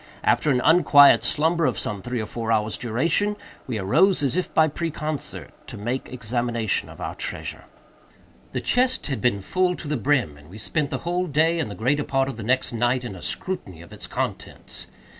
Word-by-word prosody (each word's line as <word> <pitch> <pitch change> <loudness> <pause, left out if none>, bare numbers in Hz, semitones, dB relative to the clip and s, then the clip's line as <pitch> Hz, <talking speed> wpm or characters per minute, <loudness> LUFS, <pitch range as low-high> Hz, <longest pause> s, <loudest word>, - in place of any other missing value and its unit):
After 155 - +2
an 125 -3 +2
unquiet 145 -4 +7
slumber 160 +1 +1
of 120 -7 -1
some 100 -2 -3
three 125 +4 -3
or 110 - -2
four 115 +1 -4
hours' 110 -1 +1
duration, 165 - 0 0.3
we 120 -4 -2
arose, 145 - +3
as 135 -3 +1
if 185 - -1
by 160 0 +4
preconcert, 155 -2 -4 0.2
to - - -7
make 120 +6 -4
examination 120 -2 -1
of - - -12
our - - -4
treasure. - - -5 0.9
The - - -2
chest 255 +1 +1
had 130 -7 -3
been 120 -5 +1
full 180 - +1
to 165 - -8
the 150 0 -1
brim, 125 - +1
and 75 +2 -17
we 100 - -11
spent 145 +6 -2
the - - -2
whole 180 +1 0
day, 165 +3 +2
and 155 - -2
the 100 - -7
greater 140 +9 +1
part 135 -1 0
of 135 - -6
the - - -6
next 125 +2 0
night, 120 +2 +1
in 115 -6 -6
a 90 - -10
scrutiny 95 - -4
of 85 - -14
its - - -4
contents. - - -5
130 Hz, 200 wpm, -24 LUFS, 110-160 Hz, 0.9 s, unquiet